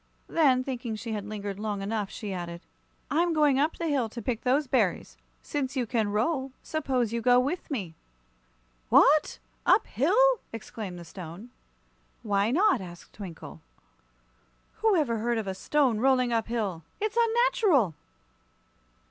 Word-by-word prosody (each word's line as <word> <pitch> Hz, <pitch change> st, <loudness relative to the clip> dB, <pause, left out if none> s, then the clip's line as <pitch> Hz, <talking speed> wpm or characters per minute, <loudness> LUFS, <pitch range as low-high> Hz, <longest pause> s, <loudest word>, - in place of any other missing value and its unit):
Then, 265 Hz, -6 st, +3 dB
thinking 245 Hz, -4 st, -4 dB
she 225 Hz, +1 st, -6 dB
had 210 Hz, -2 st, -3 dB
lingered 205 Hz, -2 st, -5 dB
long 210 Hz, -2 st, -3 dB
enough, 205 Hz, -1 st, -2 dB
she 210 Hz, -2 st, -6 dB
added: 170 Hz, -1 st, -6 dB, 0.5 s
"I'm 335 Hz, +3 st, +2 dB
going 295 Hz, -4 st, +3 dB
up 300 Hz, +3 st, +1 dB
the 335 Hz, -, -3 dB
hill 275 Hz, -7 st, 0 dB
to 235 Hz, -, -7 dB
pick 235 Hz, 0 st, -2 dB
those 270 Hz, +4 st, +2 dB
berries. 240 Hz, -8 st, 0 dB, 0.3 s
Since 285 Hz, -2 st, -3 dB
you 255 Hz, -2 st, 0 dB
can 225 Hz, -3 st, 0 dB
roll, 265 Hz, +5 st, -1 dB
suppose 255 Hz, -7 st, -1 dB
you 235 Hz, -, -1 dB
go 245 Hz, +1 st, +5 dB
with 285 Hz, +8 st, -2 dB
me." 200 Hz, -, -4 dB, 1.0 s
"What! -, -, +5 dB, 0.3 s
Up -, -, +4 dB
hill?" 445 Hz, -, +3 dB
exclaimed 215 Hz, -4 st, -7 dB
the 170 Hz, -, -9 dB
Stone. 180 Hz, +7 st, -10 dB, 0.7 s
"Why 205 Hz, -1 st, +1 dB
not?" 375 Hz, -, +3 dB
asked 175 Hz, -2 st, -11 dB
Twinkle. 165 Hz, -, -9 dB, 1.2 s
"Who 440 Hz, -2 st, +3 dB
ever 245 Hz, -9 st, +1 dB
heard 235 Hz, +1 st, 0 dB
of 220 Hz, -, -2 dB
a 190 Hz, -, -3 dB
stone 250 Hz, +3 st, +1 dB
rolling 255 Hz, -1 st, +3 dB
up 225 Hz, -1 st, 0 dB
hill? 210 Hz, -8 st, -2 dB, 0.2 s
It's 430 Hz, +1 st, -2 dB
unnatural!" 455 Hz, -, +3 dB
240 Hz, 150 wpm, -28 LUFS, 205-290 Hz, 1.2 s, go